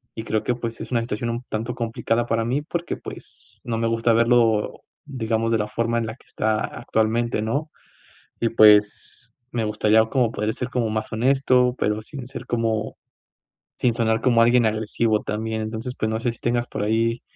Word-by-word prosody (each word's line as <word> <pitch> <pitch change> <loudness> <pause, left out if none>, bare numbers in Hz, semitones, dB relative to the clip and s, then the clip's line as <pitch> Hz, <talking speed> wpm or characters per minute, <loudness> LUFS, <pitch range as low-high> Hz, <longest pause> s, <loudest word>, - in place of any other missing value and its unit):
y 110 - -5
creo 110 -2 -1
que, 125 - +1
pues, 115 -1 -5
es - - -8
una 120 - +2
situación 115 0 -3
un 120 +2 -3
tanto 115 +3 -3
complicada 115 0 -1
para 115 -1 0
mí 130 +5 0
porque, 170 +2 -4
pues, - - -12
no 115 -2 -2
me 115 0 0
gusta 115 +1 +1
verlo, 115 -2 +2 0.2
digamos, 115 -4 -1
de - - +4
la 105 - -1
forma 115 +1 -1
en 115 - -2
la 110 - -6
que - - -25
está 110 0 0
actualmente, 115 -1 -1
¿no?, 140 +8 -2 0.7
y 115 - +2
pues, 105 +2 +4 0.2
me 115 -2 -1
gustaría 105 +1 +3
como 120 -1 +1
poder 105 0 -2
ser 125 -1 -4
como 120 -3 0
más 110 0 -3
honesto, 125 +1 +3
pero 105 +1 0
sin 130 +1 -8
ser 125 -1 -8
como 115 -2 -1 0.8
sin 120 -2 +1
sonar 110 -1 +1
como 120 -2 +4
alguien 120 0 +4
agresivo 110 0 0
también, 110 +1 -3
entonces, 110 +3 -4
pues, 110 - -1
no 110 0 -1
sé 120 0 0
si 115 - -13
tengas 120 0 0
por - - -4
ahí, 115 +2 +1
115 Hz, 195 wpm, -23 LUFS, 110-120 Hz, 0.8 s, de